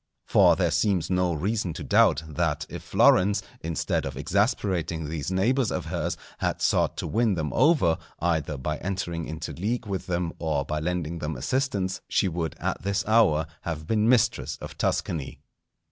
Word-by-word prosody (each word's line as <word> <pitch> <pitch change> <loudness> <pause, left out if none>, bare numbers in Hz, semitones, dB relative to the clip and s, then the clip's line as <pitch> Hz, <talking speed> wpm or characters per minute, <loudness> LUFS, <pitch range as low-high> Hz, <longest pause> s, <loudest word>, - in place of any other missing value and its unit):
For - - +5
there 85 -3 +1
seems 90 0 +1
no 90 -1 +2
reason 95 +2 -1
to - - -6
doubt, 105 -8 +4
that 75 - -1
if - - -7
Florence, 100 +2 +4 0.2
instead 80 -2 -1
of 65 -1 -5
exasperating 85 - 0
these 75 -1 -3
neighbours 115 +6 +1
of 90 - -3
hers, 85 0 -2 0.2
had - - -1
sought - - +1
to - - -3
win 110 -2 +2
them 80 -3 -2
over, 130 - +3 0.2
either 80 -3 -1
by 75 +4 -3
entering 90 -3 -3
into 80 0 -5
league 110 - -2
with 100 -2 -4
them 85 -2 -1
or 75 -4 -1
by 75 +2 -2
lending 85 0 -2
them 75 -1 -3
assistance, 95 - -1
she 100 - +2
would 85 -2 -3
at - - -2
this 100 +4 -1
hour 105 -9 +4 0.2
have 80 -2 -4
been 110 +4 +2
mistress 125 -4 +2
of - - -8
Tuscany. 75 -5 -2
85 Hz, 170 wpm, -26 LUFS, 80-100 Hz, 0.2 s, For